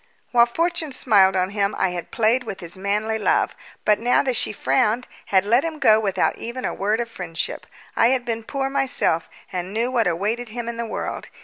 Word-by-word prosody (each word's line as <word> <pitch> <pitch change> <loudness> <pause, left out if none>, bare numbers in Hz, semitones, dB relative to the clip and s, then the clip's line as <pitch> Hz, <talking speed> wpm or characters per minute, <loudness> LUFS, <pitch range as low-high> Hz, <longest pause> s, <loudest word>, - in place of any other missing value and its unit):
While 235 -1 +5
fortune 335 +3 -1
smiled 195 -7 +4
on 185 +1 0
him 200 0 0
I 190 - +1
had 175 -1 -6
played 235 +3 +2
with 220 -5 -6
his 170 -1 -6
manly 210 +3 -1
love, 210 - +1 0.3
but 210 -1 +4
now 245 +2 +3
that 260 -3 0
she - - +2
frowned 210 - +1 0.2
had 190 -1 +3
let 235 +5 +3
him 325 -1 -3
go 220 -7 +5
without 195 -4 0
even 240 +3 -5
a - - -1
word 210 +3 0
of 235 - -2
friendship. 180 -7 -5 0.3
I 230 - +4
had 250 0 +1
been 230 -1 -2
poor 270 +3 -2
myself, 270 -11 0 0.2
and 180 0 -3
knew 235 +3 0
what 235 -5 +2
awaited 210 +8 -1
him 235 +1 -5
in 235 0 -4
the 235 0 -3
world. - - -4
220 Hz, 210 wpm, -22 LUFS, 195-245 Hz, 0.3 s, While